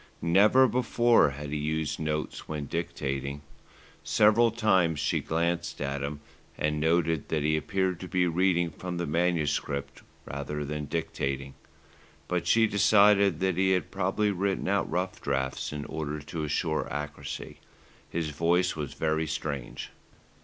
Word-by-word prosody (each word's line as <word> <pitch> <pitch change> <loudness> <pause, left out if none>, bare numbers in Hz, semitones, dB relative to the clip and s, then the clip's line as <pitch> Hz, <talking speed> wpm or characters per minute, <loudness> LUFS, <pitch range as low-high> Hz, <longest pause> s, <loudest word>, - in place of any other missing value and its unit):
Never 105 +10 +5
before 120 - +3
had 70 +1 -7
he 75 - -1
used 75 +1 -2
notes 75 -1 -3
when 75 -2 -3
dictating. 70 -3 -3 0.6
Several 110 +3 +4
times 95 -9 +2
she - - +1
glanced 85 +1 -1
at 70 0 -2
him, 70 +1 -4 0.4
and 75 0 0
noted 80 -1 +1
that 75 -2 0
he 75 +1 +2
appeared 95 +2 -1
to 95 - -7
be 90 0 +1
reading 85 0 +2
from 90 +2 -6
the 85 - -1
manuscript 75 -4 -1 0.2
rather 70 +1 -4
than 75 +1 -4
dictating; 70 -3 -3 0.7
but 90 -2 -1
she 115 +4 +5
decided 100 -1 +4
that 95 -2 +1
he 95 0 +3
had 90 - -1
probably 100 +2 0
written 95 0 -1
out 100 +1 +1
rough 90 +3 -2
drafts 65 -1 -2
in 75 -1 -5
order 75 -1 -4
to 75 +2 -5
assure 80 +1 -1
accuracy. 75 +1 -6 0.5
His 80 -2 -2
voice 85 +4 +1
was 75 -3 -5
very 80 0 0
strange. 70 -4 -4
80 Hz, 145 wpm, -28 LUFS, 75-95 Hz, 0.7 s, Never